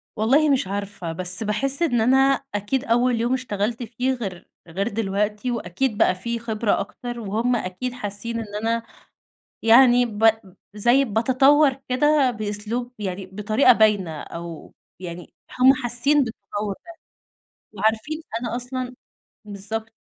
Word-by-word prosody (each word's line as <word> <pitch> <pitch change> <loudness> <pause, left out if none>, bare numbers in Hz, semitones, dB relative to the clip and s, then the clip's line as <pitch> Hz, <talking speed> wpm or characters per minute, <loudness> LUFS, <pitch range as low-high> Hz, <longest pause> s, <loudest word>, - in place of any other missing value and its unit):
والله 270 +8 +3
مش 265 -8 +2
عارفة، 200 -3 -4
بس 180 +5 -2
باحس 270 +8 -1
إن 245 -9 +2
أنا 255 +4 +4 0.4
أكيد 205 +6 -1
أول 240 0 +2
يوم 240 +2 +1
اشتغلت 230 -2 -2
فيه 250 +3 -1
غير 195 -8 -6 0.2
غير 190 +5 -2
دلوقتي 210 +1 -1
وأكيد 225 +2 -2
بقى 185 - +3
في 235 +5 -4
خبرة 220 -2 0
أكتر، 240 +4 -6
وهُم 230 +3 0
أكيد 220 +4 -4
حاسّين 230 0 -4
إن 210 -2 -7
أنا 230 +1 0 0.8
يعني 245 +2 +6
ب 225 0 +4 0.4
زي 240 +6 +3
باتطور 265 +6 +4 0.2
كده 285 +1 +3
بأسلوب 215 +2 -3
يعني 190 -1 -4
بطريقة 215 +7 +3
باينة 205 -8 +2
أو 170 -1 -9 0.3
يعني 175 -1 -8 0.3
هُم 260 +1 +7
حاسّين 260 +3 +2
بالتطوّر 210 -3 -5
ده. - - -10 0.8
وعارفين 220 +10 -1 0.2
أنا 235 -1 -3
أصلًا 250 0 -5 0.5
بالضبط، 210 +2 -5
225 Hz, 130 wpm, -23 LUFS, 205-250 Hz, 0.8 s, هُم